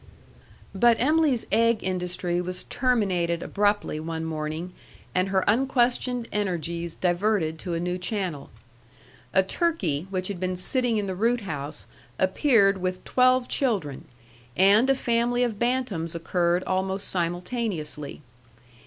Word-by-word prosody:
But 230 +4 +4
Em'ly's 295 -2 +2
egg 230 0 +3
industry 180 -1 -1
was 180 +1 -4
terminated 195 -10 0
abruptly 205 -6 0
one 160 0 -4
morning, 160 +3 -4 0.4
and 185 +1 +1
her 190 -1 +2
unquestioned 245 0 +1
energies 170 -4 -2
diverted 175 -3 0
to 175 -1 -4
a - - -1
new 180 +1 -2
channel. 180 -8 -3 0.8
A 190 - +4
turkey 190 - -1
which 185 -1 -2
had 200 -3 -5
been 185 0 -1
sitting 240 +5 +1
in 205 - -1
the 190 - -3
root 230 +5 +1
house 145 -6 -5 0.3
appeared 195 0 +3
with 185 0 -3
twelve 255 0 +3
children, 195 - -1 0.5
and 205 +7 +5
a 270 - +5
family 240 0 +1
of 225 -4 -2
bantams 235 -10 -1
occurred 175 +1 0
almost 190 +1 -1
simultaneously. 175 - -3
190 Hz, 125 wpm, -25 LUFS, 175-235 Hz, 0.8 s, and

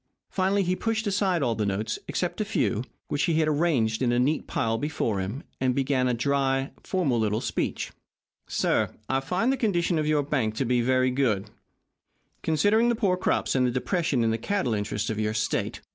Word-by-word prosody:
Finally 195 +1 +2
he 180 0 0
pushed 225 +2 -1
aside 190 -5 +1
all 120 -3 +1
the 110 - -2
notes 105 +2 -2
except - - -2
a - - 0
few, 110 - 0 0.2
which 145 - -1
he 160 -2 +2
arranged 145 -8 +1
in 125 -2 +2
a 120 - +2
neat 140 +6 +1
pile 115 0 0
before 115 -8 -1
him, 105 +10 -4 0.2
and 130 -1 +1
began 135 -2 +1
a 125 - +2
dry, 135 +2 0
formal 155 -11 0
little 110 0 +1
speech. 115 -4 -2 0.7
"I 130 +5 0
find, - - -17
sir, 190 +6 +1
the 270 - 0
condition 175 - +1
of 155 - 0
your 150 -1 +2
bank 130 -7 -1
to 130 - 0
be 125 0 +2
very 130 +1 +2
good, 110 -6 0 0.9
considering 205 +9 +3
the 235 - +2
poor 200 -5 +2
crops 180 - 0
and 130 -1 +3
the - - +1
depression 135 +1 0
in 115 - +2
the 115 - -1
cattle 195 - 0
interests 105 +1 -2
of 110 - -3
your 110 0 -1
state. 110 0 -1
135 Hz, 195 wpm, -26 LUFS, 115-175 Hz, 0.9 s, considering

